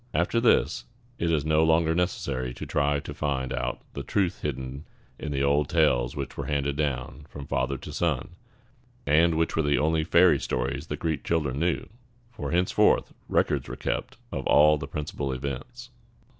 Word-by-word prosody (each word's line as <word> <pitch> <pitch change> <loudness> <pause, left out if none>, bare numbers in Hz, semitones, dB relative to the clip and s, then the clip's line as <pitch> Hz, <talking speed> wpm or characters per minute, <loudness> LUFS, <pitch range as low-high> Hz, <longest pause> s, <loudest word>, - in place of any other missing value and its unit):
After 115 - +2
this, 115 - +3 0.3
it 85 - 0
is 75 -3 +1
no 80 0 +3
longer 80 0 +3
necessary 65 -8 -2
to - - -6
try 75 0 +1
to - - -7
find 65 -3 -2
out - - -3
the 70 - -4
truth 95 +5 -1
hidden 65 0 -4 0.3
in 75 - -4
the 70 -1 0
old 70 +1 +2
tales - - +2
which 70 -2 -5
were 70 - -5
handed 70 -1 0
down 70 -1 -3
from 70 -1 -8
father 65 +1 -1
to - - -9
son, 80 -3 -1 0.8
and 80 +3 +4
which 80 +1 0
were 80 - +2
the 75 -1 +2
only 80 +1 +2
fairy 85 -2 +5
stories - - -2
the - - -4
Greek 80 -2 -2
children 75 -5 0
knew; 85 +1 0 0.4
for 120 - -5
henceforth 90 +1 +2 0.2
records - - +1
were 65 - -5
kept 65 - -3
of 65 - -3
all 75 0 +6
the 70 - -5
principal 70 -1 -4
events. 70 - -6
75 Hz, 175 wpm, -27 LUFS, 70-80 Hz, 0.8 s, all